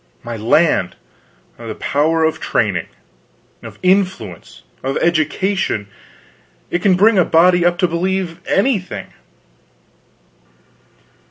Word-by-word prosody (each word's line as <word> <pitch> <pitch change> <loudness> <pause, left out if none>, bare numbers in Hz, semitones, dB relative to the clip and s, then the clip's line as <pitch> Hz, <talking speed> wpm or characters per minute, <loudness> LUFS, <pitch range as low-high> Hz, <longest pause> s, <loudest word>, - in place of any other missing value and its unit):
My 120 0 -5
land, 120 +9 +2 0.6
the 115 -2 -7
power 160 +3 0
of 160 0 0
training! 100 -8 -1 0.7
of - - -11
influence! 190 0 -1 0.2
of 135 +1 -2
education! 170 - 0 0.8
It 175 - -1
can 190 -2 +3
bring 205 +2 +4
a - - +5
body 175 +2 +4
up 175 0 +2
to 180 - +2
believe 180 0 -2
anything. 200 -3 -1
170 Hz, 100 wpm, -17 LUFS, 150-190 Hz, 0.8 s, a